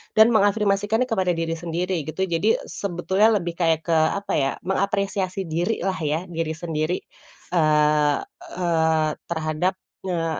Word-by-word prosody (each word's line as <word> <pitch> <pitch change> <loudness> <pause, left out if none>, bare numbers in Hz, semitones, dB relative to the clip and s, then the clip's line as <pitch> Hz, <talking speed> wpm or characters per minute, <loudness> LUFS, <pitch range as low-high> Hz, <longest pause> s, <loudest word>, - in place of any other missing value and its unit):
dan 220 +2 +7
mengafirmasikannya 205 +1 +2
kepada 185 -5 +1
diri 165 0 -2
sendiri 175 -1 -2
gitu. 175 +4 -2
Jadi 190 +4 +2
sebetulnya 190 +2 0
lebih 175 -4 -1
kayak 165 -2 +3
ke - - 0
apa, 160 +5 +1
ya, 135 -1 +1
mengapresiasi 195 0 -1
diri 175 +6 -2
lah, 190 -1 -1
ya, 155 +1 -1
diri 165 -3 -3
sendiri, 160 0 -2 0.5
eee 150 -3 +3 0.4
eee, 160 -3 +2 0.2
terhadap, 160 +3 -1 0.3
eee, 165 -3 -1
175 Hz, 135 wpm, -23 LUFS, 160-195 Hz, 0.5 s, dan